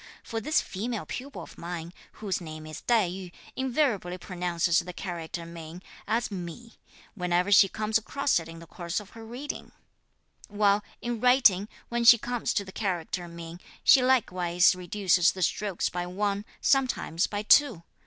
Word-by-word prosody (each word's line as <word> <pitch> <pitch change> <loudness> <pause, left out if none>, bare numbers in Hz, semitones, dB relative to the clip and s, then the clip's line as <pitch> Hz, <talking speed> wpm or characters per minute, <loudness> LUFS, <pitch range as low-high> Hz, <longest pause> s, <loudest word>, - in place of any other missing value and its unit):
for 225 0 -4
this 305 +8 +2
female 225 +3 -4
pupil 275 +3 -7
of - - -13
mine, 170 0 -6 0.2
whose 195 -4 -3
name 155 -2 -8
is 155 0 -8
Tai 225 -6 +3
yü, 180 0 -7 0.2
invariably 245 -9 0
pronounces 175 -2 0
the 180 0 -6
character 170 -2 -5
min 165 0 -9 0.3
as 225 +1 0
mi, 190 +5 -7 0.4
whenever 180 0 0
she 195 -1 +7
comes 215 +2 0
across 275 +1 0
it 165 - -9
in 165 - -9
the 165 - -11
course 170 +2 -4
of 210 -1 -13
her 225 - -11
reading; 250 +6 -7 0.8
while, 205 0 +2 0.2
in 240 -1 -2
writing, 225 -5 +4 0.2
when 235 0 -1
she 235 0 +9
comes 245 +1 -2
to 200 - -1
the 190 - -10
character 180 -3 -3
'min,' 170 0 -9 0.2
she 265 - +7
likewise 185 -9 +3
reduces 180 -1 +2
the 185 - -3
strokes 200 +1 0
by 175 0 -3
one, 200 +2 -2 0.2
sometimes 255 - +1
by 205 0 -3
two. 230 - +5
195 Hz, 165 wpm, -28 LUFS, 175-225 Hz, 0.8 s, she